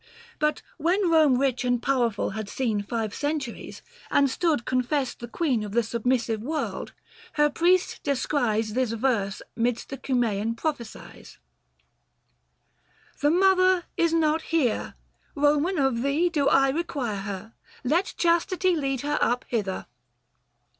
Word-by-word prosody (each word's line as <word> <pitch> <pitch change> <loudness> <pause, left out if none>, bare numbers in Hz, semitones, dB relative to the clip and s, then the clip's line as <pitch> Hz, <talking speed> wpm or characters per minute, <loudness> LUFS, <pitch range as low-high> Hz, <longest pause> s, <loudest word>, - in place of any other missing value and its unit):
But 300 0 0 0.2
when 350 +3 +2
Rome 310 -6 +5
rich 260 -2 0
and 245 -1 +1
powerful 240 -7 0
had 215 0 -5
seen 225 -5 -1
290 200 - -7
Five 225 -3 -2
centuries, 290 -5 -4 0.3
and 280 -2 +3
stood 310 -6 0
confessed 255 +1 -1
the 240 - -7
queen 250 -4 0
Of 205 -1 -6
the 235 +1 +3
submissive 235 -1 -1
world, 305 +7 -4 0.4
her 295 -1 +3
priest 360 +4 +2
descries 240 -6 0
This 250 -2 0
verse 225 -5 -1
midst 235 0 -1
the 275 - -6
Cunisean 230 -4 0
prophecies, 245 -8 -6 0.8
' - - -37
The 290 - +4
Mother 370 +1 +4
is 335 -1 +2
not 320 -1 +2
here: 315 -8 -1 0.4
Eoman 295 +6 +2
of 240 -3 0
thee 290 +6 +2
Do 290 -5 +1
I 270 0 +4
require 270 -8 -2
her: 200 +2 -6 0.3
let 330 +9 0
chastity 345 +2 +2
295 320 - -1
Lead 270 -2 -1 0.2
her - - +2
up 245 +1 0
hither.' 200 -5 -2
265 Hz, 140 wpm, -26 LUFS, 230-315 Hz, 0.8 s, Rome